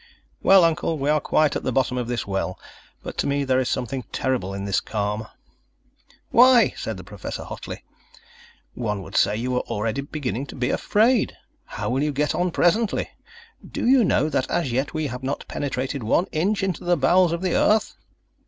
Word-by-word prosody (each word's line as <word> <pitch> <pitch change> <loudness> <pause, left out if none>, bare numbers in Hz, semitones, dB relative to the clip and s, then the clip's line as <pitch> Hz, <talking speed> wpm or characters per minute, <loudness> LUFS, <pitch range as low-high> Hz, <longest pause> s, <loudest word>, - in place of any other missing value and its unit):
"Well, 190 -2 +6
Uncle, 165 -1 +1
we 145 +1 +1
are 155 - +3
quite 155 -2 +2
at - - -1
the 130 - -2
bottom 130 0 +1
of 125 -2 -2
this 120 -1 -2
well 95 -2 -2 0.5
but - - -7
to - - +1
me 140 0 0
there 130 -1 +2
is 130 - 0
something 130 +1 -2
terrible 125 -8 -1
in 100 0 -5
this 100 -1 +1
calm." 105 0 -3 1.0
"Why," 245 0 +6
said 110 -3 -5
the 90 - -9
Professor 100 +1 -7
hotly, - - -8 0.9
"one 105 -5 -3
would 95 +2 -11
say 100 +2 +3
you 125 +3 -2
were 125 - +1
already 115 +3 -2
beginning 140 -2 -4
to - - -9
be 125 -1 -1
afraid. 225 +3 +2 0.3
How - - -4
will 130 +2 0
you 150 0 +1
get 150 +1 0
on 175 +3 0
presently? 205 +6 +1 0.5
Do - - -5
you 260 -1 +6
know, 175 - +2
that 135 -4 -1
as 170 -7 0
yet, 135 +4 -1
we 155 0 -1
have 125 -2 -5
not 135 +2 -3
penetrated 135 -1 -3
one 115 +11 +2
inch 195 +6 0
into 190 -3 -2
the 175 0 +2
bowels 180 -1 +4
of 170 +2 -3
the 185 - 0
earth." 215 +1 +2
135 Hz, 195 wpm, -23 LUFS, 120-170 Hz, 1.0 s, Well